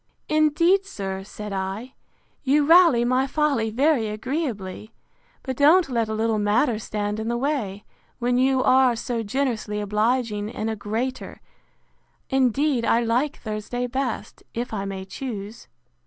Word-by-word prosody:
Indeed, 310 +5 +3
sir, 195 - -5
said 210 +1 -7
I, 195 +7 -4 0.5
you 285 +1 +3
rally 330 -7 +6
my 255 +2 +2
folly 280 -6 +1
very 255 0 +2
agreeably; 215 - -4 0.5
but 260 -2 -3
don't 310 +5 +5
let 230 -3 0
a 220 - -2
little 220 0 0
matter 215 +3 +2
stand 210 -1 -3
in 220 - -3
the 235 0 0
way, 240 -8 -2 0.3
when 245 0 +1
you 260 0 +3
are 255 -2 +4
so 230 0 -3
generously 225 -2 -2
obliging 210 +1 0
in 220 -1 -3
a 220 - -2
greater: 225 +5 -4 0.9
Indeed 265 0 +2
I 230 - +3
like 240 +5 0
Thursday 215 +3 -3
best, 260 0 -4
if 240 0 -3
I 200 -2 -2
may 190 -1 -5
choose. 215 -1 -7
235 Hz, 140 wpm, -24 LUFS, 210-270 Hz, 0.9 s, rally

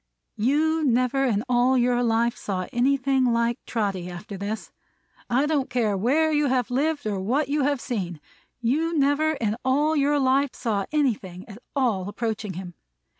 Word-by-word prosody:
You 310 +7 +2
never 255 +1 +2
in 215 -4 +1
all 250 +1 +3
your 245 0 +2
life 235 0 +1
saw 185 -2 -3
anything 265 +1 +2
like 235 -1 +1
Trotty 195 -6 -2
after 190 +4 -8
this. 205 +3 -5 0.6
I 260 +4 +2
don't 290 -3 0
care 230 -5 +1
where 285 +11 +2
you 295 -1 +2
have 250 -2 0
lived 290 +2 0
or 205 -2 -1
what 260 +9 0
you 295 +1 +1
have 285 -2 +1
seen, 190 - -4 0.4
you 315 +8 0
never 290 +2 +2
in 225 -6 -2
all 290 +4 +2
your 290 0 +2
life 270 0 +2
saw 205 -5 -2
anything 210 -12 -1
at 210 0 -11 0.2
all 220 -9 0
approaching 215 -2 -3
him! 180 0 -7
245 Hz, 165 wpm, -25 LUFS, 215-280 Hz, 0.6 s, all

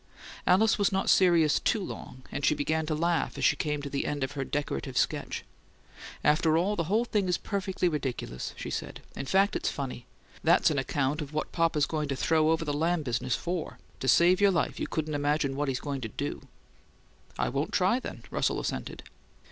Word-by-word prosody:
Alice 210 +4 +4
was 200 - +3
not 190 0 +2
serious 170 -5 +4
too 225 - +1
long, 130 -7 -8
and 140 - -4
she 150 - +4
began 155 +2 -1
to 155 - 0
laugh 170 +2 0
as - - 0
she - - +5
came 150 -2 -2
to - - -4
the 140 - -1
end 145 -2 -2
of 135 - -2
her 140 -1 -3
decorative 140 - -3
sketch. - - -1 0.8
"After 155 +1 +3
all, 195 +5 +1
the 165 - -1
whole 215 +8 +1
thing 210 -5 0
is 180 - +1
perfectly 190 -3 -1
ridiculous," 135 - -3
she - - -5
said. - - -5
"In 135 - -5
fact, 195 +7 +3
it's - - 0
FUNNY! 125 -3 -5 0.4
That's 170 0 +5
on 145 - +1
account 140 +3 -1
of 150 0 -7
what 155 - -2
papa's 165 -4 +2
going 150 -1 -2
to 140 - -2
throw 155 +3 +2
over 165 0 +1
the 145 - -1
Lamb 165 +2 +1
business 125 -1 -1
FOR! 175 -2 -4 0.2
To 130 - -3
save 175 +8 +5
your 200 - +6
life 175 -4 0
you - - -2
couldn't 155 -1 -2
imagine 145 -1 0
what 145 +1 -1
he's 130 -1 -1
going 140 -2 -4
to 110 - -4
do!" - - -5 0.9
"I - - 0
won't 140 - -2
try, 200 +4 +2
then," - - -8
Russell - - 0
assented. - - -4
155 Hz, 205 wpm, -29 LUFS, 140-175 Hz, 0.9 s, your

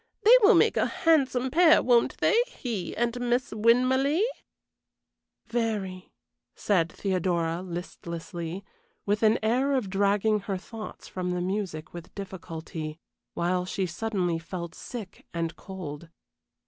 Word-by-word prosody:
They 460 +4 +9
will 420 +3 +7
make - - +4
a - - +3
handsome 265 -6 +2
pair, 330 +2 +6
won't 240 -2 +3
they - - +3
he 235 - -5
and 240 +1 0
Miss 245 +1 0
Winmarleigh?" 255 - +3 1.2
"Very," 215 -6 -2 0.4
said 175 -5 +1
Theodora, 175 -3 -1
listlessly, 170 0 -6 0.4
with 205 +1 +1
an 220 0 +5
air 255 +6 +2
of 240 -8 -1
dragging 205 +2 +2
her 195 -1 -3
thoughts 215 +3 -9
from 180 -1 -4
the 180 0 -1
music 180 -4 -3
with 170 0 -10
difficulty, 165 -5 -6 0.4
while 180 +1 +1
she 190 +1 -2
suddenly 180 -2 -1
felt 170 0 -6
sick 220 -3 -9
and 165 0 -2
cold. 170 -5 -8
195 Hz, 125 wpm, -27 LUFS, 175-235 Hz, 1.2 s, They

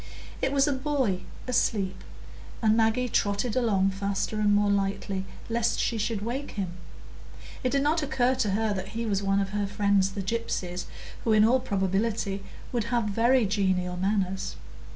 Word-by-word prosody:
It 265 - +1
was 280 0 +3
a 290 - +2
boy 260 -8 0 0.3
asleep, 200 -6 0 0.6
and 220 -1 +3
Maggie 225 +3 +2
trotted 210 +1 0
along 200 -6 +2
faster 200 +2 -2
and 205 -1 +4
more 205 0 +3
lightly, 195 -1 -1 0.2
lest 235 0 0
she 230 - 0
should 215 -1 -1
wake 255 +6 -4
him; 190 -4 -3 0.9
it 255 - +2
did 275 +1 +1
not 315 +3 +2
occur 260 -3 +2
to 255 -5 0
her 220 -1 +1
that 190 -1 -4
he 230 - -1
was 200 -3 0
one 195 0 +2
of 195 -1 -1
her 205 0 -1
friends 200 -1 +2
the 195 - -3
gypsies, 185 -4 -2 0.4
who 225 - +2
in 215 0 +6
all 250 +3 +4
probability 200 -2 -1 0.3
would 235 -4 -1
have 235 0 +1
very 235 +3 +3
genial 190 -3 0
manners. 190 0 -1
210 Hz, 170 wpm, -27 LUFS, 195-235 Hz, 0.9 s, in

